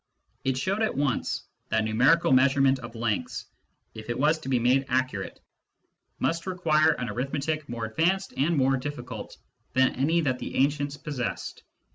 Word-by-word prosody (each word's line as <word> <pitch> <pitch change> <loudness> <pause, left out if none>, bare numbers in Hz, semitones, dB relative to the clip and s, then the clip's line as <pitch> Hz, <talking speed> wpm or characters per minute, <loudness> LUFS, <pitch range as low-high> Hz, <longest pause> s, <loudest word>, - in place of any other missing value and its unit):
It 130 -1 0
showed 190 +10 -1
at 220 - +1
once 140 -3 0 0.3
that 110 0 +2
numerical 125 +10 +3
measurement 135 +1 +4
of 120 -2 -9
lengths, 115 -3 -2 0.5
if 110 +1 -10
it 120 - -1
was 155 +3 +3
to 145 - -7
be 130 - +3
made 125 +3 +3
accurate, 125 -7 -1 0.8
must 165 +2 -1
require 160 -4 +3
an 125 -4 -4
arithmetic 140 +6 -2
more 115 -1 -3
advanced 175 +12 0
and 155 +4 +1
more 135 0 +3
difl[icult 125 -4 -6 0.4
than 130 0 +3
any 155 +6 +2
that 130 -5 0
the - - -6
ancients 145 +1 +1
possessed. 140 -5 -4
135 Hz, 155 wpm, -27 LUFS, 125-155 Hz, 0.8 s, measurement